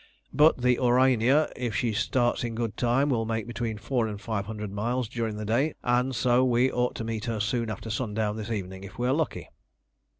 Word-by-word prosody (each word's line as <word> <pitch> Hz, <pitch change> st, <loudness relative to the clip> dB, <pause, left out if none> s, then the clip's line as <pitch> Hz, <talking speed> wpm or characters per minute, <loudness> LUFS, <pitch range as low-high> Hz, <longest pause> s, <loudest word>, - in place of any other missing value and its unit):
But 150 Hz, -4 st, +4 dB
the 125 Hz, -1 st, +3 dB
Aurania, 130 Hz, +3 st, +3 dB
if 120 Hz, -3 st, -3 dB
she 115 Hz, -3 st, 0 dB
starts 120 Hz, +3 st, +1 dB
in 115 Hz, -1 st, -3 dB
good 115 Hz, -3 st, -2 dB
time, 125 Hz, +4 st, +2 dB
will 115 Hz, -4 st, 0 dB
make 110 Hz, -1 st, -2 dB
between 115 Hz, -2 st, -3 dB
four 115 Hz, +2 st, -1 dB
and 105 Hz, -2 st, -5 dB
five 105 Hz, -2 st, -3 dB
hundred 105 Hz, -2 st, -5 dB
miles 120 Hz, +4 st, -1 dB
during 115 Hz, -2 st, -3 dB
the 105 Hz, -, -4 dB
day, 130 Hz, +8 st, +1 dB
and 125 Hz, +2 st, +1 dB
so 120 Hz, +2 st, +3 dB
we 125 Hz, +1 st, +3 dB
ought 125 Hz, 0 st, 0 dB
to -, -, -4 dB
meet 115 Hz, 0 st, -3 dB
her 115 Hz, -3 st, -2 dB
soon 115 Hz, +2 st, -1 dB
after 110 Hz, +1 st, -5 dB
sundown 110 Hz, -2 st, -1 dB
this 110 Hz, 0 st, -6 dB
evening 95 Hz, -3 st, -4 dB
if 100 Hz, +2 st, -11 dB
we 120 Hz, +1 st, 0 dB
are 130 Hz, -, +3 dB
lucky." 155 Hz, +1 st, -2 dB
115 Hz, 210 wpm, -27 LUFS, 110-125 Hz, -, But